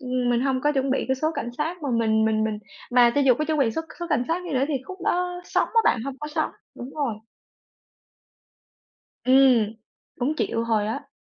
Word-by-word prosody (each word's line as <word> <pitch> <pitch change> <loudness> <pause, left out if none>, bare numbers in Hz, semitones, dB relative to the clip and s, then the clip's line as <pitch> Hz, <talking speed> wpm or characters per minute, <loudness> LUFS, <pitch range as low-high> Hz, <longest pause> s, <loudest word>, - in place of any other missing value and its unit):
ừm, 250 -2 -1
mình 240 0 +2
hông 260 -1 0
có 295 +2 +2
chuẩn 270 -1 0
bị 270 - 0
cái 265 - +3
số 310 +4 0
cảnh 240 - -3
sát, 320 +2 -3
mà 280 - -2
mình 220 -2 +2
mình 220 0 +1
mình 215 -1 -2 0.3
mà 245 -1 +6
cho 285 - +3
dù 265 -3 +5
có 305 - -2
chuẩn 310 0 -1
bị 255 -5 +3
số 320 - -3
c - - -17 0.2
số 345 - -3
cảnh 295 -7 +2
sát 345 +2 0
đi 320 - -5
nữa 265 +1 +2
thì 295 - -1
khúc 375 +3 -8
đó 360 0 0
sóng - - 0
á 455 - +3
bạn, 240 - +3
hông 275 -1 -6
có 300 - -5
sóng, 300 - -1 0.2
đúng 250 +3 -8
rồi. 280 -7 -1 2.1
Ừm, 255 -4 +5 0.4
cũng 265 +5 0
chịu 230 -6 -1
hồi 220 -3 +1
á. 220 - -4
265 Hz, 230 wpm, -24 LUFS, 235-300 Hz, 2.1 s, mà